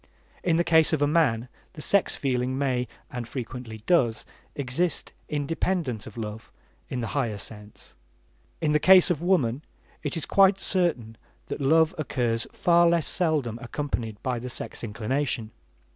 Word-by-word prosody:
In 170 -2 +2
the 170 - +3
case 160 -1 +4
of 145 -2 +2
man 135 -7 +2 0.3
the - - -11
sex 200 +5 +2
feeling 130 -1 -1
may, 130 -3 0 0.2
and 125 -2 -5
frequently 120 -3 -7
does 120 -11 +2 0.3
exist 145 +5 -1 0.2
independent 150 - -2
of 110 - -11
love 110 0 -6 0.4
in 125 - -3
the 115 - -3
higher 120 -7 -1
sense; 105 0 -9 0.7
in 155 -2 +1
the 150 - +3
case 185 +1 +7
of 165 - -1
woman 150 -9 +1 0.4
it 145 +1 -3
is 160 - 0
quite 195 0 +5
certain 155 - 0 0.3
that - - -4
love 160 +3 +4
occurs 120 -6 -1
far 170 0 +4
less 170 -2 +1
seldom 145 -10 0
unaccompanied 120 -4 -4
by 125 -2 -1
the 125 +2 -6
sex 120 - -6
inclination. 115 +1 -2
135 Hz, 150 wpm, -26 LUFS, 115-165 Hz, 0.7 s, case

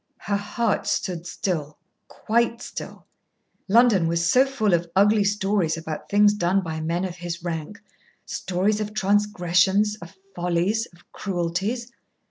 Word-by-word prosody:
Her 200 - -1
heart 210 +2 -1
stood 175 -2 -2
still, 155 -6 -3 0.3
quite 235 +1 0
still. - - -8 0.6
London 210 -5 +4
was 170 0 +1
so 255 +9 +5
full 220 -8 0
of 170 0 +1
ugly 205 +2 +4
stories 200 -5 0
about 160 -1 -6
things 205 0 +5
done 195 -1 +1
by 160 -2 -4
men 170 +4 -1
of 180 -1 -6
his 175 -1 -6
rank 170 +4 -5 0.5
stories 195 +4 -1
of 210 0 -5
transgressions, 200 0 +2
of 170 +3 -11 0.2
follies, 180 +6 0
of 175 0 -23
cruelties. 195 +7 -3
190 Hz, 135 wpm, -24 LUFS, 170-210 Hz, 0.6 s, so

